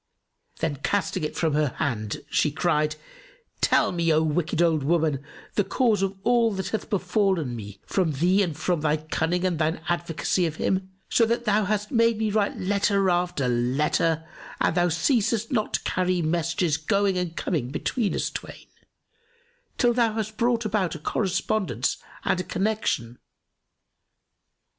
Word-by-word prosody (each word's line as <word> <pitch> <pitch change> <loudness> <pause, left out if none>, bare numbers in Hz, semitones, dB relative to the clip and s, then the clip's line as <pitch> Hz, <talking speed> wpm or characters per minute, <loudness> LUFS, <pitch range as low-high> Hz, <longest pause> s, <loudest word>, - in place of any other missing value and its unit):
Then, 150 -3 -1
casting 185 +3 -1
it 150 - -3
from 160 -3 0
her 150 -3 +1
hand, 110 -6 -2
she 150 - +3
cried, 155 -1 +1 0.7
"Tell - - +3
me 170 -2 +1
O 155 0 +3
wicked 160 +1 -1
old 165 -3 +3
woman, 155 -2 +1 0.3
the 205 - +2
cause 225 -2 +1
of 195 0 -1
all 235 -1 +3
that 190 -1 -3
hath 220 - -3
befallen 185 - 0
me 100 -3 -8
from 180 -5 0
thee 180 +8 +3
and 165 -6 -1
from 175 -1 0
thy 155 0 +2
cunning 160 +3 -1
and 175 -4 0
thine 160 +1 0
advocacy 170 +1 0
of 155 - -5
him, 190 +3 -1 0.2
so 230 - +3
that 235 +1 -1
thou 210 0 +2
hast 210 +1 -1
made 230 -2 +3
me 220 -1 0
write 205 -1 0
letter 200 0 +2
after 175 -6 0
letter 150 +6 +1 0.3
and - - +2
thou 175 0 +2
ceasest 225 - +1
not 215 -5 0
to - - -2
carry 185 0 0
messages, 165 0 0
going 200 +4 +1
and 180 -2 -3
coming 140 -8 -1
between 205 - -1
us - - -1
twain, - - -8 1.1
till 240 -2 +3
thou 230 -2 +2
hast 215 -1 -3
brought 235 0 +1
about 200 -5 0
a - - -7
correspondence 190 +4 -1 0.3
and 180 - +1
a - - -1
connection. 185 - -1
180 Hz, 160 wpm, -25 LUFS, 155-205 Hz, 1.1 s, she